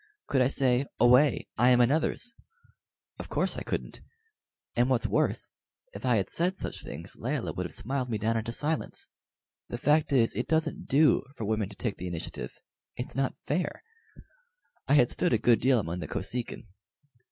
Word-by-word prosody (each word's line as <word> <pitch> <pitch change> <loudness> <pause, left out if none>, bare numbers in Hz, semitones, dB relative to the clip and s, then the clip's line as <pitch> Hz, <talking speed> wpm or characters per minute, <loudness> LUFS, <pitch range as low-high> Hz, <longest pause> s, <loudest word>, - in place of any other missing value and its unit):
Could 135 -2 +1
I 125 - +5
say 130 -1 +2
"Away! 125 +5 +5
I 125 +2 +6
am 125 -1 +5
another's"? 155 - +2 0.9
Of - - -7
course - - 0
I - - -5
couldn't; - - -4 0.7
and 120 +2 +3
what's 130 -3 +2
worse, - - 0 0.4
if 105 +6 -5
I 125 - +4
had 100 -3 +1
said 180 +3 0
such - - -4
things - - -7
Layelah - - -2
would - - -3
have - - -13
smiled 130 +1 -2
me 110 - -1
down 110 +2 0
into 115 +1 -2
silence. 150 +6 -2 0.6
The 120 - -3
fact 150 +4 +2
is, 120 -5 +3
it 125 - -2
doesn't 160 -1 0
do 150 +3 +4
for 110 - -4
women 105 -2 0
to 100 - -12
take 100 +2 -3
the 90 - -5
initiative 85 -2 -5 0.4
it's 125 - -5
not 135 -1 0
fair. 180 - -2 1.0
I 140 - +4
had 125 -4 +5
stood - - +1
a - - +5
good 115 0 +3
deal 130 +1 +4
among 85 -2 -3
the 80 - -5
Kosekin. 120 +8 -3
125 Hz, 180 wpm, -29 LUFS, 115-140 Hz, 1.0 s, I